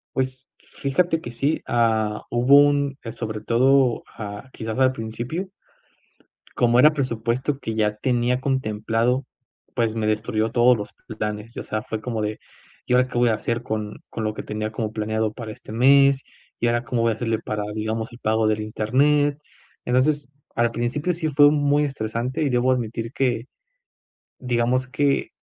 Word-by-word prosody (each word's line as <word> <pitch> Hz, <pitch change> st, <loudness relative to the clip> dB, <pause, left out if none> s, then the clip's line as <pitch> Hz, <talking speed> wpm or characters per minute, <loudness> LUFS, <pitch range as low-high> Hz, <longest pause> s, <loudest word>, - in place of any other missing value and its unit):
Pues 130 Hz, 0 st, -3 dB
fíjate 165 Hz, +4 st, -1 dB
que 120 Hz, -, -7 dB
sí 140 Hz, +6 st, 0 dB
ah 110 Hz, -2 st, +1 dB
hubo 125 Hz, +4 st, +5 dB
un 145 Hz, -1 st, +3 dB
eh, 115 Hz, -, -5 dB
sobre 110 Hz, -2 st, -5 dB
todo 130 Hz, +1 st, +3 dB
ah, 105 Hz, +4 st, -7 dB
quizás 110 Hz, +1 st, -5 dB
al 130 Hz, -1 st, +5 dB
principio. 125 Hz, -, -5 dB, 1.1 s
Como 120 Hz, 0 st, +4 dB
era 150 Hz, +3 st, +7 dB
presupuesto 130 Hz, +1 st, -1 dB
que 110 Hz, -4 st, -4 dB
ya 105 Hz, -1 st, +1 dB
tenía 125 Hz, +2 st, 0 dB
contemplado, 120 Hz, -1 st, 0 dB, 0.5 s
pues 115 Hz, -2 st, 0 dB
me 110 Hz, -1 st, -1 dB
destruyó 110 Hz, +1 st, 0 dB
todos 125 Hz, +1 st, +5 dB
los 105 Hz, -, -6 dB, 0.3 s
planes, 105 Hz, +2 st, -4 dB
o -, -, -4 dB
sea 110 Hz, 0 st, -3 dB
fue 110 Hz, -1 st, -5 dB
como 115 Hz, -3 st, -3 dB
de: 105 Hz, 0 st, -3 dB, 0.5 s
"¿Y 125 Hz, -, 0 dB
ahora 125 Hz, 0 st, +4 dB
qué 125 Hz, -, -5 dB
voy 120 Hz, -1 st, +4 dB
a 110 Hz, -, +2 dB
hacer 115 Hz, +2 st, -2 dB
con 110 Hz, -2 st, -4 dB
con 110 Hz, -, -5 dB
lo 110 Hz, 0 st, -1 dB
que -, -, -6 dB
tenía 110 Hz, 0 st, -4 dB
como 110 Hz, 0 st, -3 dB
planeado 110 Hz, 0 st, -1 dB
para 115 Hz, -3 st, -7 dB
este 105 Hz, -, -11 dB
mes?", 135 Hz, +3 st, +5 dB, 0.4 s
"¿Y 120 Hz, -, +1 dB
ahora 120 Hz, +1 st, +1 dB
cómo 120 Hz, -1 st, -1 dB
voy 115 Hz, -, +3 dB
a -, -, -2 dB
hacerle 115 Hz, -1 st, -1 dB
para, 105 Hz, -1 st, -3 dB
digamos, 110 Hz, +2 st, -3 dB
el 120 Hz, -, -13 dB
pago 110 Hz, -1 st, +1 dB
del 110 Hz, 0 st, +1 dB
internet?". 140 Hz, +7 st, +2 dB, 0.5 s
Entonces, 135 Hz, +3 st, +2 dB, 0.3 s
al 115 Hz, 0 st, +2 dB
principio 130 Hz, +9 st, -1 dB
sí 160 Hz, -2 st, -2 dB
fue 145 Hz, 0 st, +6 dB
muy 145 Hz, 0 st, +2 dB
estresante 120 Hz, -1 st, -3 dB
y 145 Hz, -, +2 dB
debo 125 Hz, +1 st, +2 dB
admitir 115 Hz, -1 st, -2 dB
que, 125 Hz, -3 st, 0 dB, 0.9 s
digamos 125 Hz, +1 st, 0 dB
que 140 Hz, +1 st, +1 dB
120 Hz, 170 wpm, -23 LUFS, 110-130 Hz, 1.1 s, era